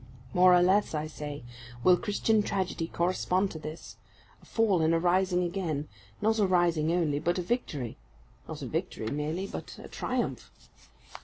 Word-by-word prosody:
More 180 0 +7
or 175 - +5
less, 190 -1 +3
I 150 0 -1
say, 150 -3 -7 0.4
will 180 - +7
Christian 210 +3 +1
tragedy 185 -4 -2
correspond 185 +2 0
to 160 - -7
this 155 +1 -8 0.4
a - - -19
fall 210 -7 +2
and 160 +1 +3
a - - +2
rising 180 +1 +2
again; 170 -5 -2 0.3
not 220 +1 +2
a 200 - +4
rising 170 -3 +2
only, 160 -5 +1
but 175 +4 0
a 180 - -1
victory; 150 - -3 0.5
not - - -7
a - - -3
victory 110 - -3
merely, 155 +6 -2
but - - -7
a - - -10
triumph. - - -3
175 Hz, 165 wpm, -29 LUFS, 155-190 Hz, 0.5 s, More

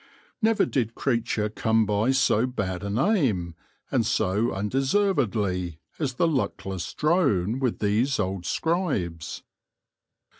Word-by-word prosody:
* - - -35
Never 220 -1 +3
did 115 -4 -1
creature 115 -4 0
come 110 +1 +1
by 105 +3 +1
so 130 -3 +3
bad 95 -8 -3
a 100 - -4
name, 115 - +1 0.4
and - - +2
so 105 +6 +1
undeservedly, 105 - 0 0.2
as 135 -6 -2
the 170 - +2
luckless 95 - -2
drone 135 - +2
with 130 -4 0
these 110 +6 +1
old 95 -3 -2
scribes. 135 - -2
115 Hz, 120 wpm, -26 LUFS, 95-135 Hz, 0.4 s, Never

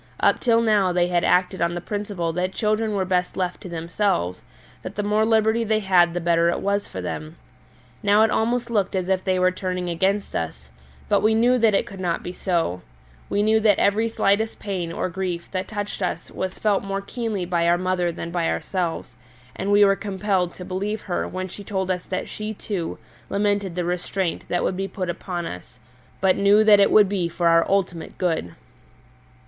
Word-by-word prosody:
Up - - +3
till 230 -2 +3
now 210 -5 +3
they 175 0 +1
had 175 -1 +1
acted 180 +1 +2
on 170 0 +1
the - - -2
principle 200 -3 -3
that 180 +2 -1
children 215 0 0
were 190 -1 0
best 180 -1 -1
left 180 -1 -2
to 185 - -8
themselves, 165 - -1 0.4
that - - -7
the 205 - -2
more 210 +1 +2
liberty 220 +1 +3
they 220 -1 +1
had 175 -3 +3
the - - 0
better 170 0 +2
it - - -1
was 200 0 -1
for - - -6
them. 155 +2 -5 0.7
Now 205 +1 +4
it 220 - +3
almost 240 +1 0
looked 200 -4 0
as 185 -1 -1
if 190 -1 +1
they 185 -1 +1
were 185 0 +3
turning 180 -1 -3
against 195 +4 0
us; 70 -5 -4 0.4
but - - +3
we 220 +1 +3
knew 245 +3 +3
that 220 -3 +4
it - - +2
could 195 -1 -10
not 175 -2 -1
be 180 - -5
so 165 - -1 0.5
we 205 +1 +1
knew 220 +1 +4
that 210 -3 +4
every 210 +3 +2
slightest 220 0 +1
pain 185 -5 -4
or 170 - -2
grief 180 -1 -4
that 185 -1 -3
touched 205 -1 -5
us 180 - -3
was 185 0 -4
felt 205 -2 +1
more 195 0 -3
keenly 215 -3 -3
by 170 -1 +1
our 175 +1 +4
mother 180 -1 0
than 170 0 -6
by 170 -1 0
ourselves, 170 - -3 0.4
and 195 +2 -2
we 205 0 +6
were 195 0 +4
compelled 195 -2 -1
to 180 - -8
believe 200 +4 -3
her 180 - -2
when 185 0 -4
she 200 +3 -9
told 190 -2 -2
us 180 -1 -3
that 185 - -3
she, 215 0 -5
too, 190 -5 -4 0.3
lamented 200 -3 0
the 180 -1 -1
restraint 180 0 -2
that 175 - 0
would - - 0
be 195 +1 -2
put 185 -3 -3
upon 175 0 -5
us, 90 - -8 0.4
but 190 -1 +3
knew 200 +2 +5
that 210 -1 +7
it 200 - +5
would 210 -2 +6
be 185 -3 -1
for 170 +1 0
our 165 0 +5
ultimate 180 -4 -1
good. 165 - -1
190 Hz, 210 wpm, -23 LUFS, 175-205 Hz, 0.7 s, that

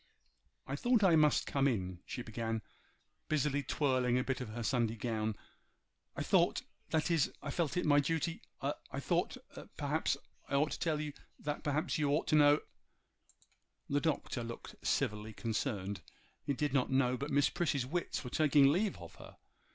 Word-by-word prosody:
'I 135 +1 -3
thought 240 - +3
I 180 -4 +6
must 150 -1 +4
come 140 0 +2
in,' 95 -8 -1
she 130 -2 -4
began, 115 -1 -3 0.7
busily 145 -2 +1
twirling 130 -3 +1
a 125 - +1
bit 130 0 -2
of 125 - -5
her 115 +2 -5
Sunday 115 -2 +1
gown. 110 -2 -2 0.8
'I - - -2
thought—that 160 +2 +1
is 165 -4 +2
I 145 - -3
felt 165 -1 -1
it 180 - +1
my 145 -1 +5
duty—I 165 +3 -3
thought—perhaps—I - - -3
ought 150 +2 +2
to - - -4
tell 155 -3 0
you—that 150 0 -6
perhaps 150 +2 0
you 145 -2 +2
ought 145 +3 +2
to - - +4
know—' 145 0 +6 1.3
The 145 +1 +2
Doctor 145 -6 -1
looked 115 0 -7
civilly 105 +1 -1
concerned. 105 -3 -2 0.4
He 140 - 0
did 145 0 -1
not 130 -3 +2
know 130 -1 +3
but 140 +4 -4
Miss 140 0 +3
Prissy's 150 -7 0
wits 170 +4 -2
were 125 - -7
taking 145 -2 +5
leave 195 +6 +1
of - - -10
her. - - -13
140 Hz, 160 wpm, -34 LUFS, 120-150 Hz, 1.3 s, I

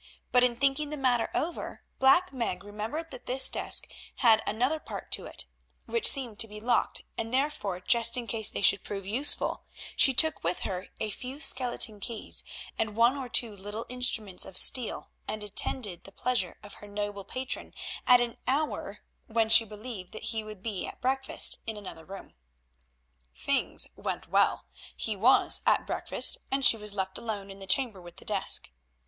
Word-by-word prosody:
But 250 0 +5
in 245 -1 +2
thinking 275 +3 0
the 300 - -5
matter 250 -4 +1
over 335 +3 -4 0.2
Black 275 +6 +4
Meg 230 -8 -3
remembered 220 +11 -6
that - - -11
this 260 +1 +3
desk - - -1 0.3
had 225 -3 +4
another 255 +9 0
part - - -9
to - - +1
it, - - -8 0.4
which 465 - +4
seemed 245 -7 +2
to 225 - +4
be 210 0 -10
locked, 240 +3 0 0.2
and, 225 0 -3
therefore, 255 -9 -1
just 235 +4 +3
in 245 - -4
case 225 -2 +1
they - - -4
should 195 +1 +5
prove 195 -2 -6
useful, 250 +9 +2 0.3
she 270 - +5
took 315 +4 +4
with 170 +2 -1
her 185 0 -4
a 215 - -3
few 260 +6 -8
skeleton 250 -6 +1
keys 220 +2 -4 0.4
and 215 -2 -1
one 235 +4 +4
or 265 -3 -6
two 225 -3 +3
little 205 +3 -7
instruments 235 -6 -1
of 185 - -7
steel 250 -4 +1 0.2
and 215 -1 -4
attended 205 -2 0
the 195 - -12
pleasure 235 -4 -1
of 205 - -11
her 205 - -11
noble 205 -1 -5
patron 255 +6 -4 0.4
at 250 0 +7
an 240 -1 -2
hour 295 +4 -2 0.3
when 225 -1 0
she 225 +1 +8
believed 210 -3 -9
that 215 - -9
he 220 -1 -3
would 215 -3 -11
be 210 -5 -4
at - - -10
breakfast 265 +1 0
in 220 -1 -3
another 185 -5 -9
room. 195 +1 -11 1.0
Things - - 0
went - - -5
well; - - +2 0.3
he 215 - -1
was 235 +7 +5
at - - +3
breakfast - - +1
and 270 0 0
she - - +7
was 210 -2 +1
left 190 -1 -3
alone 205 -4 -5
in 195 - -11
the 195 - -9
chamber 215 -2 +2
with 175 -1 -14
the - - -12
desk. - - +1
225 Hz, 180 wpm, -28 LUFS, 205-255 Hz, 1.0 s, she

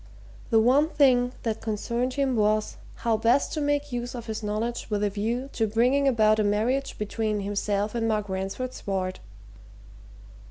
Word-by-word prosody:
The 225 - +5
one 265 +7 +4
thing 250 -5 +3
that 225 -2 -2
concerned 235 +3 -2
him 275 -3 +1
was 215 0 +1 0.2
how 230 -2 0
best 235 +5 +2
to 310 - -2
make 290 0 0
use 245 0 -4
of 235 -2 -6
his 220 -1 -4
knowledge 215 +3 -3
with 210 -1 -1
a 205 - +1
view 235 +6 -2
to 225 - +1
bringing 250 +6 +2
about 215 -4 +4
a - - +3
marriage 225 +7 0
between 210 0 -2
himself 205 +1 -1
and 230 -1 -1
Mark 210 -2 0
Ransford's 195 +7 -4
ward. 185 -1 -2
225 Hz, 165 wpm, -26 LUFS, 210-250 Hz, 0.2 s, The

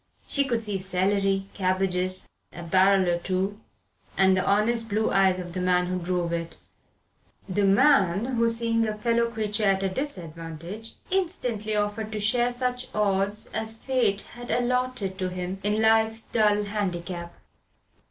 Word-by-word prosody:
She 280 -1 +1
could 235 -4 0
see 205 -3 -1
celery, 195 +1 0
cabbages, 185 -1 +1 0.3
a 175 - -8
barrel 190 +2 +3
or 175 0 +1
two, 190 +3 -2 0.6
and 190 0 +5
the 185 - +1
honest 225 +3 +2
blue 215 +2 0
eyes 190 -1 +3
of 175 -1 -7
the 185 - -3
man 180 0 +2
who 180 0 -2
drove 175 -1 -2
it 170 0 -4 0.9
the 200 +1 +1
man 195 -2 +4
who, 230 -3 +1
seeing 230 -1 +1
a 215 - -2
fellow 235 +2 +1
creature 215 -1 -1
at 195 -1 +2
a 195 - +1
disadvantage, 175 - -6 0.2
instantly 250 - -1
offered 210 +1 -2
to 215 - -3
share 240 +4 +2
such 250 0 -2
odds 205 0 +1
as 220 0 -2
Fate 230 -6 0
had 240 0 -11
allotted 245 -5 0
to 185 -1 -1
him 180 +1 -5
in 210 +2 0
life's 220 0 +3
dull 210 -2 +2
handicap. 180 -4 -4
205 Hz, 150 wpm, -26 LUFS, 185-225 Hz, 0.9 s, and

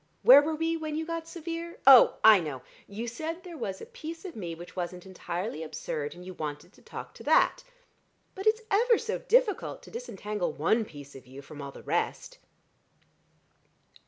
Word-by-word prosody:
Where 270 +3 +10
were 310 +2 -2
we 325 +1 0
when 310 -1 -4
you 320 +1 -2
got 330 0 -4
severe? 335 0 -6
Oh, 265 -2 +9
I 215 -2 +9
know. 145 -7 -5 0.2
You 220 +4 -6
said 320 +9 -5
there 355 -3 -9
was 195 -9 -4
a - - -7
piece 325 +3 -9
of 355 - -7
me 175 -6 -5
which 175 +2 -12
wasn't 180 0 -5
entirely 185 -1 -5
absurd, 150 -1 -5
and 180 +1 -11
you 185 - -7
wanted 150 -3 -6
to - - -21
talk - - -9
to - - -12
that. - - +3 0.7
But 385 +3 -5
it's 440 +1 +3
ever 460 +3 +4
so 460 +1 -3
difficult 480 -4 +1
to - - -13
disentangle 210 - -4
one 215 +9 +1
piece 145 -5 -12
of 130 -2 -13
you 135 +2 -11
from 145 +1 -10
all 140 0 -6
the - - -13
rest." - - -2
230 Hz, 190 wpm, -28 LUFS, -, 0.7 s, Where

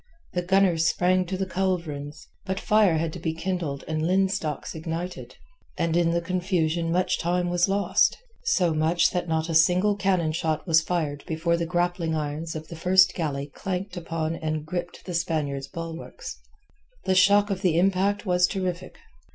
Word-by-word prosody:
The 180 - 0
gunners 180 -3 +3
sprang 185 +2 +2
to 185 +1 -3
the 190 - -1
culverins. 160 -6 -3 0.2
But 190 -1 -3
fire 210 -6 +3
had 160 0 -2
to 180 - -7
be 160 -1 -2
kindled 165 -5 -3
and 155 -1 -2
linstocks 185 -3 0
ignited, 165 +3 -5 0.4
and 165 -1 0
in 170 -1 +3
the 170 0 +1
confusion 170 -2 0
much 180 +2 +1
time 175 +1 0
was 175 +2 +2
lost—so 200 - +1
much 160 +3 +2
that 175 -1 -2
not 160 0 0
a 165 - -3
single 180 +6 +4
cannon 185 -5 +1
shot 155 -1 -1
was 165 -3 +4
fired 160 -4 -2
before 165 +1 0
the 170 0 -2
grappling 175 -1 0
irons 155 +2 -3
of 155 0 -6
the 165 - -8
first 185 +3 +4
galley 145 -5 -2
clanked 185 +6 -5
upon 165 -2 -3
and 155 -2 -3
gripped 175 +2 -5
the 180 - -5
Spaniard's 150 -5 -1
bulwarks. 165 +2 -7 0.7
The 190 - +2
shock 200 +2 +5
of 190 -1 -2
the 175 -4 +2
impact 195 +3 +2
was 180 -1 +3
terrific. 185 -2 -4
175 Hz, 165 wpm, -25 LUFS, 160-185 Hz, 0.7 s, shock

